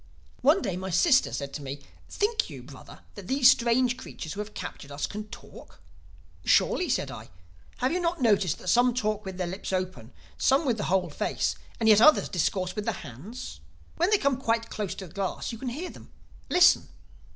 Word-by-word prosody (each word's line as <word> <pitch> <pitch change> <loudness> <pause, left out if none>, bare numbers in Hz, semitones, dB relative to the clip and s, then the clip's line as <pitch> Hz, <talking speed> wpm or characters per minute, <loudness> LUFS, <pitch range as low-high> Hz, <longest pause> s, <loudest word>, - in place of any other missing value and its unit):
"One 300 +9 +4
day 180 - -2
my 190 +1 -5
sister 260 - +4
said 140 -1 -5
to 150 - -5
me, 140 +1 -6 0.3
'Think 430 +2 0
you, - - -9
Brother, - - -13
that - - -10
these 260 -1 +6
strange 245 +1 +2
creatures 160 -10 -7
who 200 - -8
have 210 0 -6
captured 140 - -7
us 140 +1 -2
can 210 +1 -7
talk?' - - -13 0.6
"'Surely,' - - +3
said - - 0
I, - - -10 0.5
'have 255 - 0
you 360 - 0
not 345 0 -1
noticed 205 - +2
that - - -12
some 245 +5 +4
talk 215 -3 -1
with 190 -1 -6
the 185 - -1
lips 185 +3 -5
only, 185 -12 -3 0.3
some 270 +4 +3
with 240 -4 +1
the 205 - -2
whole 185 0 +1
face, - - -1 0.3
and 225 - +1
yet 215 -1 +7
others 305 +5 +6
discourse 185 +1 -1
with 210 -1 -3
the - - -3
hands? 145 - -9 0.4
When 350 +3 +2
they 425 - +5
come 280 -7 +1
quite 230 -2 0
close 210 -3 -3
to 190 - -7
the 160 - -16
glass 195 +3 -3
you 230 - -8
can 255 - -3
hear 310 +9 -5
them. - - -15 0.4
Listen! 355 0 +5
215 Hz, 205 wpm, -27 LUFS, 185-260 Hz, 0.6 s, yet